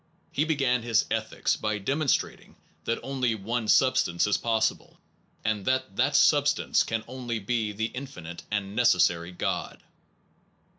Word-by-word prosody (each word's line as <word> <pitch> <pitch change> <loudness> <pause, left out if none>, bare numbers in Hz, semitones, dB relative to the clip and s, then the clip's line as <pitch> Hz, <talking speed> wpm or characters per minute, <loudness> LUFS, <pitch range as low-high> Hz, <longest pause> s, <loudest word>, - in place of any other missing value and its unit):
He 150 - +1
began 135 -6 +1
his 115 -1 +2
Ethics - - 0
by 105 0 -2
demonstrating 140 +8 -1 0.3
that 115 - 0
only 130 -4 -1
one 110 +2 -3
substance 125 -9 +3
is 105 - +2
possible, 115 -1 -1 0.5
and 110 -2 0
that 130 -6 0
that 140 +5 +1
substance 145 0 +3
can 115 -1 -2
only 125 -3 -4
be 110 0 -1
the 110 +2 -2
infinite 90 -11 -8
and 100 -1 -3
necessary 90 -7 +3
God. 90 - -3
115 Hz, 135 wpm, -27 LUFS, 105-130 Hz, 0.5 s, substance